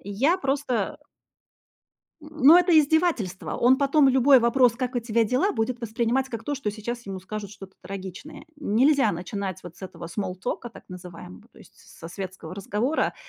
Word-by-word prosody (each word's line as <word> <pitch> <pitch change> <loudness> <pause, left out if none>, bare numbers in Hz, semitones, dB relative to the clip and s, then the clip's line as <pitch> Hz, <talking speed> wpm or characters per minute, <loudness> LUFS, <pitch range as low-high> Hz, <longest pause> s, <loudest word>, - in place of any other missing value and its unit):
Я 265 - 0
просто, 270 - -1
э - - -28 1.2
Н 300 - -12 0.2
ну, 325 +4 +10
это 355 -2 +4
издевательство. 305 - +1
Он 250 +2 +4
потом 280 0 +4
любой 265 0 +5
вопрос 235 +1 +4
"Как 250 0 -3
у - - +3
тебя 230 -1 0
дела?" 260 - +1
Будет 235 +1 -2
воспринимать 235 +3 -1
как 230 -2 -6
то, 290 - -2
что 215 -6 -3
сейчас 235 +2 -6
ему 190 -1 -6
скажут 205 +1 -7
что-то 195 -2 -12
трагичное. 195 - -9
Нельзя 265 -2 +2
начинать 185 +2 -5
вот 175 -1 -11
с - - -18
этого 185 -2 -8
смоллтока 195 +5 -4
так 235 - -14
называемого, 175 - -11
то - - -19
есть - - -18
со 165 - -13
светского 185 -2 -8
разговора, 210 +9 -1
235 Hz, 170 wpm, -25 LUFS, 195-275 Hz, 1.2 s, ну